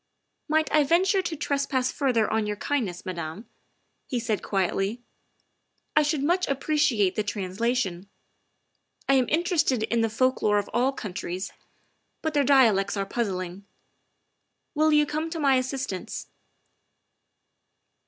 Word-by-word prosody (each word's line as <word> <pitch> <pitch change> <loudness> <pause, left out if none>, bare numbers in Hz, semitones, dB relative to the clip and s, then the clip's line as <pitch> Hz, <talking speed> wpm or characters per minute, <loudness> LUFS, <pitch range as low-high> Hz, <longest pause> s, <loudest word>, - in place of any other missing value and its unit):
" - - -52
Might 315 0 +1
I 305 -1 +5
venture 375 +6 +3
to 345 -3 -4
trespass 275 -3 0
further 245 -6 +1
on 220 -1 0
your 210 - -2
kind 265 +2 -1
ness, 175 -1 -8
Madame?" 170 +3 -5 0.6
he 250 -5 -1
said 225 -3 -1
quietly. 195 +4 -1 0.5
" - - -48
I 300 - +6
should 300 -1 0
much 355 +4 +1
ap 275 -1 -1
preciate 270 -12 +2
the 215 - 0
translation. 200 -1 -2 1.0
I 275 - +4
am 260 -3 +3
interested 320 - +1
in 230 +1 +1
the 225 - +1
folk 255 +4 +1
lore 210 -1 +3
of 205 - -2
all 250 +4 +2
countries, 185 -6 -5 0.7
but 315 -1 -1
their 290 -1 +3
dialects 225 -8 +4
are 195 - -1
puzzling. 190 -4 -3 1.1
Will 310 0 +3
you 300 0 +5
come 310 +2 -3
to 330 0 -5
my 280 -3 +4
assistance 255 -6 -4
250 Hz, 145 wpm, -26 LUFS, 205-295 Hz, 1.1 s, I